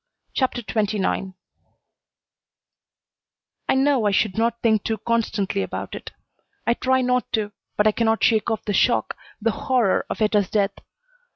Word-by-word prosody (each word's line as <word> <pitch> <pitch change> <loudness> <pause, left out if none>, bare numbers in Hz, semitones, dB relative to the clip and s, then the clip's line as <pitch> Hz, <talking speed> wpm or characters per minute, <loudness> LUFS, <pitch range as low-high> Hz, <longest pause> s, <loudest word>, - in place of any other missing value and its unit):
CHAPTER 255 -2 0
XXIX 200 -2 -1 2.3
I - - +4
know 265 -3 +3
I - - +2
should 195 -1 +1
not 230 +1 0
think 220 -3 +3
too 220 - -1
constantly 215 -3 -1
about - - -5
it. - - -7 0.6
I 235 - +3
try 260 +2 +1
not 250 0 0
to, 210 -2 0 0.3
but 210 - +3
I 215 - +6
cannot 225 0 +1
shake 220 -1 +3
off 220 -2 -2
the 205 - -1
shock, - - +2 0.2
the 230 +1 +1
horror 240 -4 +1
of - - -4
Etta's 210 -3 +2
death. 200 -2 +1
220 Hz, 150 wpm, -23 LUFS, 205-235 Hz, 2.3 s, I